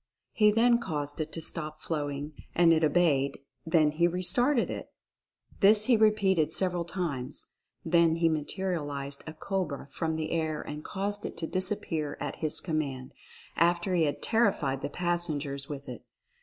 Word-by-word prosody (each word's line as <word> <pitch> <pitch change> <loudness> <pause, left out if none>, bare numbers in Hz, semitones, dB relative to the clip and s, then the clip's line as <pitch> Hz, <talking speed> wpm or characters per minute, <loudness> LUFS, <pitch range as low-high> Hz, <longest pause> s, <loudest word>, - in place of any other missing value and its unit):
He 210 -1 +4
then 235 +3 +4
caused 150 -7 -3
it 155 +1 -4
to 165 - -3
stop 155 -1 -2
flowing, 145 -2 -3 0.2
and 170 -1 +6
it 160 0 +2
obeyed; 145 -4 +2 0.3
then 160 -2 +4
he 170 +3 +3
restarted 235 - +2
it. - - -6 0.7
This 210 +1 +5
he 245 - +5
repeated 200 -7 +3
several 180 -1 0
times. 165 -8 -4 0.3
Then 165 -1 +4
he 165 0 +2
materialized 150 -4 -2
a 155 - -6
cobra 155 -6 -3
from 160 +1 -2
the 160 0 -3
air 160 -2 -1
and 150 +1 -7
caused 205 +1 -3
it - - -6
to 165 - -2
disappear 175 -4 -2
at - - -4
his 155 -2 -1
command, 140 -6 -3 0.4
after 175 +3 +2
he 170 -3 +3
had 145 - -3
terrified 195 - +1
the - - -3
passengers 155 -5 -1
with 140 -1 -7
it. 125 -3 -8
165 Hz, 155 wpm, -29 LUFS, 150-185 Hz, 0.7 s, and